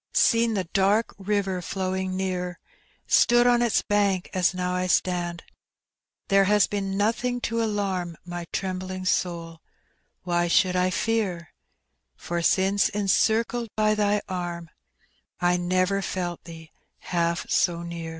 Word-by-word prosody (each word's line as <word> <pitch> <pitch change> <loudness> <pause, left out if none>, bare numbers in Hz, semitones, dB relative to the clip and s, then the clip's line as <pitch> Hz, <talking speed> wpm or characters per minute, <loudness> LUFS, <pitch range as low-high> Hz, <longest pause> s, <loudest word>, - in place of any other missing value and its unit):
— - - -49 0.2
Seen 230 -1 +1
the 190 - 0
dark 200 +5 +1
river 195 -2 -1
flowing 185 +1 -3
near, 180 -2 -3 0.5
Stood 240 0 +4
on 240 -1 +4
iU 240 - +2 0.2
bank 200 -3 +1
a« 185 - -2
now 180 0 -2
I 180 0 -1
stand,— 175 -2 0 0.8
There 195 -1 +4
has 205 0 +4
been 195 -1 -3
nothing 240 +4 0
to 230 0 -1
alarm 195 -6 -2
My 175 -1 -6
trembling 185 0 -4 0.2
goal; 165 -2 -8 0.6
why 175 -1 0
should 180 +2 +3
I 180 0 +2
Ten 195 -5 -1 0.7
For 175 - -4
BJnce 190 +4 +2
encircled 220 +3 +1
by 215 0 +2
Tiiy 210 -1 +1
arm, 175 -2 -5 0.7
J 180 0 +2
never 185 +2 +1
felt 175 -3 -4
Thee 160 -1 -11 0.3
half 170 -1 -1
so 170 -1 +1
near. 170 -1 -6
185 Hz, 135 wpm, -25 LUFS, 175-205 Hz, 0.8 s, Stood